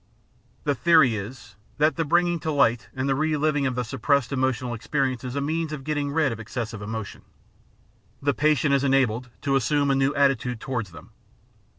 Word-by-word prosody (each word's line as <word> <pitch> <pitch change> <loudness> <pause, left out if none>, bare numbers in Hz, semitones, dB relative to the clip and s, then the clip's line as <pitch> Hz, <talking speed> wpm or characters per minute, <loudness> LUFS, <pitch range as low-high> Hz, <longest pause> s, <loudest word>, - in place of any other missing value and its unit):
The 145 - +1
theory 155 -5 +4
is 105 +1 -8 0.2
that 150 0 +3
the 165 - 0
bringing 175 +2 +2
to 155 - -2
light 120 -5 +2
and 130 +1 -2
the 135 - +2
re 155 +2 0
living 150 -2 +1
of 130 - -2
the 125 - -1
suppressed 135 +3 0
emotional 130 -2 -1
experiences 130 +1 -2
is - - -7
a 140 - -1
means 160 +2 -2
of 150 -3 -6
getting 145 -1 -2
rid 155 -3 +2
of 115 - -6
excessive 115 -1 -5
emotion. 110 -1 -6 1.0
The 145 0 +1
patient 150 0 +2
is 140 -1 +2
enabled 125 -3 +1
to 140 -1 +1
assume 140 +2 +2
a - - +2
new 135 +1 +2
atti 140 -3 +3
tude 125 -1 -5
towards 120 -8 -3
them. 80 -2 -13
135 Hz, 195 wpm, -25 LUFS, 120-150 Hz, 1.0 s, theory